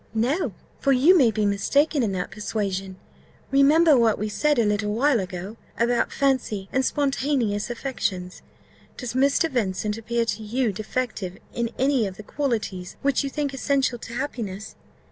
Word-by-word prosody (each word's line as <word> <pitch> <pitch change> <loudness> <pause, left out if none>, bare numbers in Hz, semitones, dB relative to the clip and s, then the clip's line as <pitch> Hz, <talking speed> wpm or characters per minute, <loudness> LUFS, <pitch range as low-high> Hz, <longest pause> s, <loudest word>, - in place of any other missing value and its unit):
"No; 255 +11 0 0.2
for 275 - +3
you 290 +9 +6
may 265 -9 +5
be 215 -1 0
mistaken 280 +9 +2
in 220 -4 0
that 180 -1 -3
persuasion. 195 -2 -3 0.6
Remember 295 +3 +6
what 230 -3 +3
we 215 +1 -2
said 300 +7 +1
a 230 - +3
little 210 0 0
while 250 +3 +3
ago, 185 +3 -6 0.2
about 235 +1 +1
fancy 255 -8 0
and 265 - +1
spontaneous 265 -7 0
affections. 205 -8 -3 0.6
Does 250 -3 -5
Mr. 280 +5 +3
Vincent 210 - -1
appear 235 +1 -1
to 215 -1 -3
you 225 +1 -1
defective 215 -3 -3 0.2
in 235 -1 -1
any 265 -4 +2
of 185 - -8
the 215 - -9
qualities 215 -9 -3
which 280 -1 +2
you 275 - -2
think 285 0 -2
essential 270 -2 0
to 230 - -9
happiness? 215 -6 -4
235 Hz, 160 wpm, -24 LUFS, 205-275 Hz, 0.6 s, you